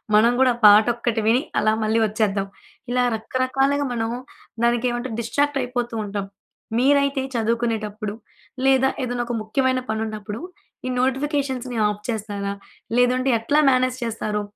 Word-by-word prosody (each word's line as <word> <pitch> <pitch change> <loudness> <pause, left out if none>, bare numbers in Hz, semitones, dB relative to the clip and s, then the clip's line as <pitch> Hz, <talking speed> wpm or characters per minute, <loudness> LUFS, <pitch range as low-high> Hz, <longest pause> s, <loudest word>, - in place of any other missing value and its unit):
మనం 230 +3 +6
గూడా 260 -1 +5
ఆ - - -14
పాట 210 +1 +8
ఒక్కటి 235 -1 -1
విని 240 +4 +4 0.2
అలా 215 - +2
మళ్ళీ 220 +1 +2
వచ్చేద్దాం. 205 -2 0 0.4
ఇలా 250 0 +2
రకరకాలుగా 270 +5 0
మనం 225 -1 -1 0.5
దానికి 240 +1 +2
ఏమంటే 240 +2 -3
డిస్‌ట్రాక్ట్ 285 +5 0
అయిపోతూ 245 -1 -3
ఉంటాం. 200 -1 -4 0.5
మీరైతే 280 +1 +3
చదువుకునేటప్పుడు, 220 -2 -1 0.5
లేదా 265 0 +4
ఏదైనా 245 -1 -2
ఒక 240 - -3
ముఖ్యమైన 255 +4 +1
పని 220 0 -1
ఉన్నప్పుడు 215 0 -6 0.5
ఈ - - -1
నోటిఫికేషన్స్‌ని 265 -2 -1
ఆఫ్ 210 0 -3
చేస్తారా? 205 -3 -3 0.4
లేదంటే 255 +2 +3
ఎట్లా 285 +7 +2
మేనేజ్ 255 0 +1
చేస్తారు? 215 -2 -2
240 Hz, 135 wpm, -22 LUFS, 215-260 Hz, 0.5 s, పాట